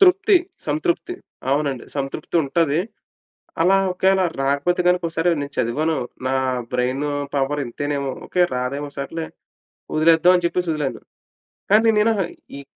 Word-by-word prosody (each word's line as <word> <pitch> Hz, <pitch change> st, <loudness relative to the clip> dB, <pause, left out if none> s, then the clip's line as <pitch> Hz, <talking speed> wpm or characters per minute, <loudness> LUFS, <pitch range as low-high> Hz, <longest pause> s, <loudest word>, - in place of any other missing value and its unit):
తృప్తి. 390 Hz, +1 st, +6 dB, 0.3 s
సంతృప్తి. 160 Hz, -, -1 dB, 0.4 s
అవునండి 140 Hz, -3 st, 0 dB
సంతృప్తి 140 Hz, +4 st, -4 dB
ఉంటాది. 155 Hz, +2 st, +1 dB, 0.8 s
అలా 190 Hz, +3 st, +5 dB, 0.2 s
ఒకవేళ 190 Hz, +1 st, +2 dB, 0.2 s
రాకపోతే 145 Hz, +6 st, +1 dB
గనుక 180 Hz, -1 st, +2 dB
సరే 165 Hz, +2 st, +3 dB
నేను 145 Hz, 0 st, -5 dB
చదివాను, 155 Hz, +7 st, 0 dB, 0.3 s
నా 130 Hz, -, +1 dB, 0.4 s
బ్రైన్ 130 Hz, +3 st, 0 dB, 0.3 s
పవర్ 140 Hz, +1 st, 0 dB
ఇంతేనేమో, 140 Hz, +2 st, -3 dB, 0.2 s
ఓకే 180 Hz, -, +2 dB
రాదేమో, 135 Hz, +4 st, -2 dB
సర్లే 160 Hz, +4 st, -4 dB, 0.7 s
వదిలేద్దాం, 165 Hz, +3 st, +5 dB
అని 175 Hz, -, 0 dB
చెప్పేసి 175 Hz, 0 st, 0 dB
వదిలాను. 150 Hz, -3 st, -2 dB, 0.7 s
కానీ 225 Hz, +2 st, +6 dB
నేను 225 Hz, +2 st, +4 dB, 0.4 s
ఈ 140 Hz, -, -7 dB
155 Hz, 120 wpm, -21 LUFS, 140-180 Hz, 0.8 s, తృప్తి